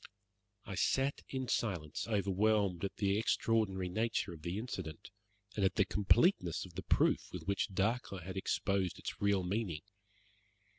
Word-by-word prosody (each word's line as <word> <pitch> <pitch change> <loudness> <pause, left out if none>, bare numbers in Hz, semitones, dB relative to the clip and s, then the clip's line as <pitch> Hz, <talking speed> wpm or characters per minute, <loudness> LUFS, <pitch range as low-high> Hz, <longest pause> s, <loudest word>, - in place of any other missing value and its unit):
I - - -6
sat 135 +8 +1
in 130 -1 -3
silence, 90 -11 -1
overwhelmed 100 -2 +2
at 100 - -2
the 100 0 +1
extraordinary 110 -4 +1
nature 110 0 -1
of 80 - -11
the 85 +4 -3
incident, 95 -9 -6 0.4
and 105 - 0
at 95 - +2
the 100 - +4
completeness 105 - +3
of 90 - -13
the - - -4
proof - - +2
with - - -6
which 100 0 0
Dacre 100 +2 -1
had 95 +3 -7
exposed 95 -1 0
its - - -6
real 100 -2 +3
meaning. 90 -4 -2
100 Hz, 150 wpm, -35 LUFS, 90-110 Hz, 0.4 s, the